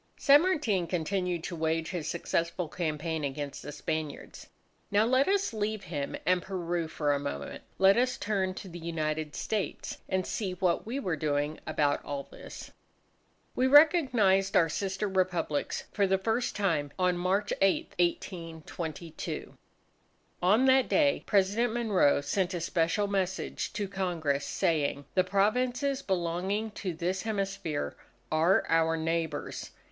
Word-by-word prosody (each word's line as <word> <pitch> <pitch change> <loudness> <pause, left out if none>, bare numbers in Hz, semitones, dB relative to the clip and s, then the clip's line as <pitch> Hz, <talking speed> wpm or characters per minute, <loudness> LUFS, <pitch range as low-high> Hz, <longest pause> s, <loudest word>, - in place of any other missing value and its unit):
San 285 +1 +6
Martin 245 - +1
continued 180 0 -1
to 175 - -4
wage 160 0 -1
his 170 -5 -3
successful 170 0 -1
campaign 160 -1 -2
against 140 0 -4
the 145 - -7
Spaniards. 150 0 -5 0.4
Now, 205 +2 +3
let 260 +3 +3
us 395 -7 +1
leave 215 -1 -2
him 150 -6 -4
and 180 +1 +3
Peru 175 -3 -2
for 150 -2 0
a 140 - 0
moment. 140 0 -5 0.2
Let 195 +2 +6
us 250 +1 +2
turn 195 -3 -1
to 195 - -8
the 175 -1 -8
United 155 -2 -3
States 210 -3 -3
and 185 -1 0
see 195 -5 -2
what 180 +1 0
we 255 +5 -2
were 185 -11 -1
doing 145 0 -1
about 150 -2 +1
all 140 -1 -4
this. - - -10 0.8
We 255 - +2
recognized 260 - +5
our 165 -2 +4
sister 195 +4 -2
Republics 180 -6 -1
for 200 -2 +2
the 190 0 +3
first 225 +5 -1
time 165 -8 0
on 180 -1 +2
March 190 +4 0
8, 195 -1 +2
1822. 165 -2 -4 0.9
On 210 +8 +4
that 265 -1 +4
day 290 -2 +3
President 210 +4 +2
Monroe 200 -12 +3
sent 180 +6 -1
a - - -2
special 170 +4 +1
message 190 -1 -2
to 205 - -2
Congress 170 -7 -1
saying, 145 -3 0
"the 185 - +4
Provinces 250 +8 +1
belonging 190 +3 -1
to 185 -4 -4
this 180 +3 -1
hemisphere 195 -7 -2 0.4
are 165 +6 +3
our 165 0 +2
neighbours." 160 -2 -2
185 Hz, 140 wpm, -29 LUFS, 160-205 Hz, 0.9 s, San